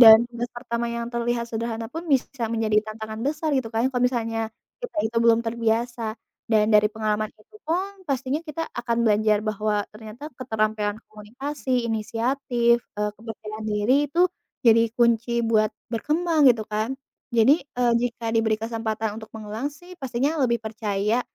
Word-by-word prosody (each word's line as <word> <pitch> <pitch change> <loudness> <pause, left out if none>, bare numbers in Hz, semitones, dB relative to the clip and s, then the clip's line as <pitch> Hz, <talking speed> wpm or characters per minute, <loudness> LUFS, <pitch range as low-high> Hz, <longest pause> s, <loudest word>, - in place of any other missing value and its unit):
Dan 220 -2 +12
tugas 240 0 -4
pertama 235 -1 -2
yang 235 0 -3
terlihat 235 0 0
sederhana 225 0 -3
pun, 325 - -3
bisa 260 -1 -2
menjadi 220 -2 +1
tantangan 220 0 -6
besar 305 +2 -1
gitu 245 -4 -1
kan, 225 - +2
kalau 245 0 0
misalnya, 230 -2 -2 0.4
kita 425 -9 -6
itu 230 +1 -7
belum 230 0 +6
terbiasa. 235 +1 0 0.5
Dan 215 -1 +5
dari 210 0 +6
pengalaman 215 -1 0
itu 425 - -18
pun, 355 +4 +1 0.2
pastinya 270 +2 0
kita 325 +2 -3 0.2
akan 235 -1 -1
belajar 215 -1 +4
bahwa 215 0 0 0.2
ternyata 215 +3 -11 0.2
keterampilan 215 -3 0
komunikasi, 250 +4 -3
inisiatif, 235 +2 +1 0.2
eee, 210 0 +1
kepercayaan 215 -1 -7
diri 210 +4 +2 0.2
itu, 340 - +1 0.5
jadi 230 0 +7
kunci 235 0 +3 0.2
buat 215 -1 +4 0.2
berkembang, 315 +6 +1
gitu 225 -2 +1
kan. 215 +3 -1 0.4
Jadi, 260 +6 +5
e 250 -3 -5 0.2
jika 235 -2 -2
diberi 225 -1 +2
kesempatan 225 -1 -3
untuk 220 - -10
mengulang 220 +5 -4
sih, 350 +5 -14
pastinya 270 +4 0
lebih 235 -2 +3
percaya, 215 +1 0
230 Hz, 150 wpm, -25 LUFS, 220-250 Hz, 0.5 s, Dan